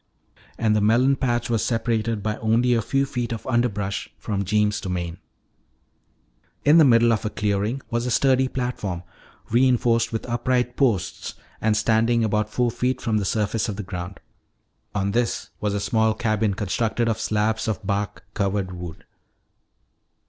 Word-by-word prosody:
And 110 -2 +2
the 105 - +2
melon 120 +6 +4
patch 120 -3 0
was 115 -2 0
separated 115 -2 -1
by 110 0 -1
only 115 +3 +2
a 115 - +2
few 135 +5 +1
feet 125 -4 -3
of 115 - -5
underbrush 105 -5 -1
from 100 -2 -2
Jeems' 105 +2 +1
domain. 90 -2 -4 1.5
In 150 +3 +7
the - - +8
middle 115 -3 +5
of 110 - -1
a 110 - -1
clearing 105 +5 -1
was 120 +1 -1
a - - 0
sturdy 130 +1 +3
platform, 120 -9 -3 0.5
reinforced 120 -1 +3
with 115 - -3
upright 125 +1 0
posts 110 -10 0 0.3
and 110 -1 +2
standing 115 +1 +2
about 105 0 0
four 120 +2 0
feet 130 +2 -1
from 110 -4 0
the 100 - -2
surface 110 +3 0
of 105 - -3
the 105 - -5
ground. 90 0 -6 0.8
On 100 0 0
this 120 +2 -1
was 105 -1 -1
a - - 0
small 110 0 +1
cabin 110 -3 0
constructed 115 +3 -1
of 110 -1 0
slabs 110 +1 0
of 110 -1 -3
bark 100 0 -2
covered 100 -1 -1
wood. 90 -2 -8
110 Hz, 160 wpm, -23 LUFS, 105-120 Hz, 1.5 s, the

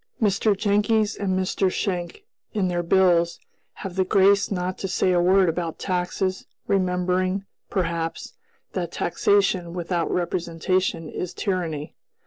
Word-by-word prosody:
Mr. 205 -1 +2
Jenckes 210 +1 +2
and 190 -2 -1
Mr. 190 0 +1
Schenck, 180 - -3 0.3
in 190 -3 +1
their 175 -1 0
bills, 170 -1 +3 0.3
have 190 -2 -7
the 190 - +3
grace 195 +1 +4
not 185 -1 -2
to 195 - -2
say 185 0 +1
a 175 -1 +3
word 185 +1 +4
about 165 0 -2
taxes, 185 +1 -2 0.2
remembering, 185 0 0 0.2
perhaps, 165 -3 -2 0.4
that - - -3
'taxation 200 - +1
without 175 -1 -1
representation 175 0 -1
is 180 +3 -5
tyranny.' 170 -6 -2
185 Hz, 125 wpm, -24 LUFS, 175-195 Hz, 0.4 s, grace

